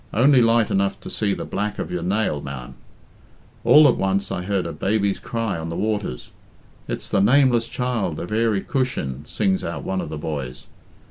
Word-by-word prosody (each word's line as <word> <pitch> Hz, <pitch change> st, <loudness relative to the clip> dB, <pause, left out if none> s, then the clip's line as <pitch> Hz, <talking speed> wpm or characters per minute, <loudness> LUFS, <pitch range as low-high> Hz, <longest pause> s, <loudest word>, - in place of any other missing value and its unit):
Only 130 Hz, +3 st, +5 dB
light 115 Hz, -1 st, +3 dB
enough 100 Hz, 0 st, +1 dB
to -, -, -8 dB
see 100 Hz, -2 st, 0 dB
the -, -, -5 dB
black 105 Hz, +1 st, -3 dB
of -, -, -4 dB
your 90 Hz, -1 st, -2 dB
nail, 90 Hz, -4 st, 0 dB
ma'am. 70 Hz, -3 st, -7 dB, 0.9 s
All 150 Hz, 0 st, +8 dB
at 125 Hz, -, +3 dB
once 95 Hz, +1 st, 0 dB
I -, -, -2 dB
heard 95 Hz, 0 st, -1 dB
a 85 Hz, -, -3 dB
baby's 100 Hz, -1 st, 0 dB
cry 115 Hz, -7 st, -3 dB
on 80 Hz, 0 st, -5 dB
the 85 Hz, -, -4 dB
waters. 105 Hz, -, -3 dB, 0.6 s
'It's -, -, -4 dB
the 95 Hz, -, +1 dB
nameless 120 Hz, +1 st, +4 dB
child 120 Hz, -12 st, -2 dB
of 90 Hz, -, -6 dB
Earey 110 Hz, -2 st, +1 dB
Cushin,' 110 Hz, -, -2 dB
sings 95 Hz, -3 st, 0 dB
out 85 Hz, -, -4 dB
one 95 Hz, -1 st, -2 dB
of -, -, -6 dB
the 80 Hz, -, -5 dB
boys. 70 Hz, -5 st, -5 dB
100 Hz, 190 wpm, -22 LUFS, 85-115 Hz, 0.9 s, All